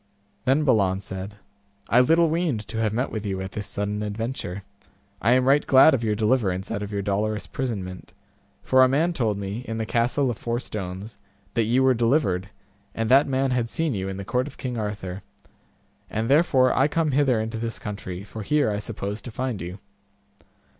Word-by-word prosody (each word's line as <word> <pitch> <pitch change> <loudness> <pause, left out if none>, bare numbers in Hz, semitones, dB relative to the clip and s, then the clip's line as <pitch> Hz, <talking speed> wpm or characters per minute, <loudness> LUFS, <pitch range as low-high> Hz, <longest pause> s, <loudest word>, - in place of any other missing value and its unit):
Then 135 +4 +3
Balan 100 -9 +3
said, 95 +1 -7 0.5
I 120 - +4
little 165 +6 +5
weened 155 -9 -1
to 110 - -3
have 110 -2 +1
met 125 +5 -1
with 110 -2 -4
you 95 -3 -2
at 95 0 -5
this 105 -2 -5
sudden 105 +1 -3
adventure; 105 -3 -4 0.6
I 115 +4 +4
am 130 0 +3
right 140 +2 +5
glad 135 +4 +7
of 120 - 0
your 105 -1 +1
deliverance 105 -4 0
out 105 -2 -2
of 105 0 -5
your 100 -1 -2
dolorous 105 +1 -1
prisonment, 100 -8 -5 0.5
for 130 0 +5
a - - +6
man 155 +7 +1
told 110 -9 0
me, 100 +4 -4
in 115 - -3
the 110 - -2
castle 120 +4 +1
of 115 - -7
Four 120 0 -2
Stones, 100 -1 -6 0.3
that 115 -1 +2
ye 120 +4 +2
were 130 0 +5
delivered, 115 - +1 0.5
and 115 +1 -1
that 135 +2 +6
man 135 0 +1
had 120 -2 0
seen 160 -1 -1
you 95 -2 -3
in 95 - -5
the 100 - -6
court 125 +5 0
of 145 - -11
King 125 -2 -4
Arthur, 105 -3 -4 0.9
and 110 +1 -2
therefore 135 -4 +4
I 135 - +4
came 155 0 0
hither 135 -4 +3
into 110 +1 -3
this 115 0 -3
country, 100 -3 -6
for 110 +2 -8
here 145 +2 +2
I 105 - -2
supposed 105 -1 -5
to - - -5
find 125 -2 -3
you. 90 +3 -6
115 Hz, 200 wpm, -24 LUFS, 100-130 Hz, 0.9 s, glad